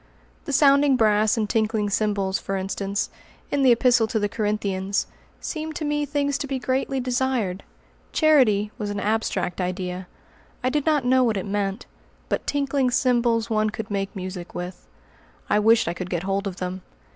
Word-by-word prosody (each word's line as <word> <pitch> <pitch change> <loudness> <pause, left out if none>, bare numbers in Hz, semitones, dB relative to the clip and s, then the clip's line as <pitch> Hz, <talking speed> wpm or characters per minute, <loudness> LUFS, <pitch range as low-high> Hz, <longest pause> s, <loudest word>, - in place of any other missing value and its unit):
The - - -4
"sounding 280 0 +5
brass 215 -2 +3
and 215 -2 0
tinkling 215 -1 0
cymbals," 200 -2 0
for 195 - -3
instance, 195 +1 -2 0.4
in 285 - +1
the 260 -2 +6
Epistle 240 -1 +4
to 220 - -1
the 205 -1 +1
Corinthians, 200 -2 -1 0.3
seemed 315 -1 -5
to 310 - -3
me 295 0 0
things 285 0 0
to 285 - -3
be 270 -1 -2
greatly 265 +1 -1
desired. 245 -6 -1 0.5
"Charity" 240 -10 +4
was 210 -2 -3
an 205 0 -3
abstract 205 -4 -1
idea. 180 0 -3 0.6
I 255 - +1
did 295 +2 -1
not 295 -5 +2
know 255 +1 +4
what 225 -4 +1
it 190 - -3
meant. 200 +1 -2 0.4
But - - -2
"tinkling 280 -2 +1
cymbals" 235 -2 +1
one 215 0 +2
could 220 0 -6
make 195 -1 -2
music 185 -2 -6
with. 180 +1 -6 0.6
I 210 - +4
wished 225 +2 +4
I 170 - 0
could 180 +1 -6
get 175 -1 -2
hold 195 +1 -1
of 190 - -5
them. 185 0 -4
215 Hz, 175 wpm, -24 LUFS, 195-260 Hz, 0.6 s, the